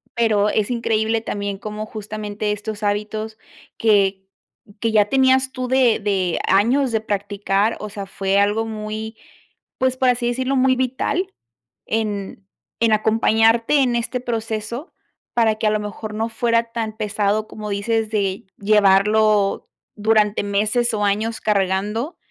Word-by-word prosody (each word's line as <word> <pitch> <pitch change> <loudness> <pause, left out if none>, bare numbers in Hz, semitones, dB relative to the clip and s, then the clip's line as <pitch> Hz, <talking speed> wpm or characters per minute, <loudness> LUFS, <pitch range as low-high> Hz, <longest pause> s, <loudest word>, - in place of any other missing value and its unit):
Pero, 215 -3 +2
es 210 +1 0
increíble 225 -1 0
también 200 -2 -4
como 215 +1 -6
justamente 210 -1 -4
estos 210 0 -5
hábitos 215 +2 -2 0.4
que 200 -3 +3 0.6
que 225 +1 0
ya 210 -2 +4
tenías 265 0 +3
tú 255 -1 -4
de 255 -3 +3
de 190 -4 0
años 240 +8 +3
de 220 -1 0
practicar, 205 0 -1
o 210 - -6
sea, 200 -1 -6
fue 195 0 -1
algo 205 +3 +2
muy, 220 0 -5 0.6
pues, 260 0 +1
por 260 - +2
así 245 -1 +1
decirlo, 260 +3 -1
muy 260 0 +3
vital 260 +8 -1 0.6
en 205 -3 -3 0.3
en 230 -1 +3
acompañarte 225 +4 +3
en 245 -2 +1
este 235 +2 -2
proceso 230 - -4 0.4
para 225 -2 +3
que 215 - -3
a - - +3
lo 215 - +1
mejor 210 +1 -6
no 225 +1 -1
fuera 230 0 0
tan 220 -2 -3
pesado, 210 0 0
como 210 -1 -7
dices, 220 +2 -1
de 195 -3 -1
llevarlo 210 0 +3 0.3
durante 210 -1 +2
meses, 215 +4 0
o, 210 - -1
años 215 +3 -1
cargando, 210 - 0
215 Hz, 145 wpm, -21 LUFS, 205-230 Hz, 0.6 s, ya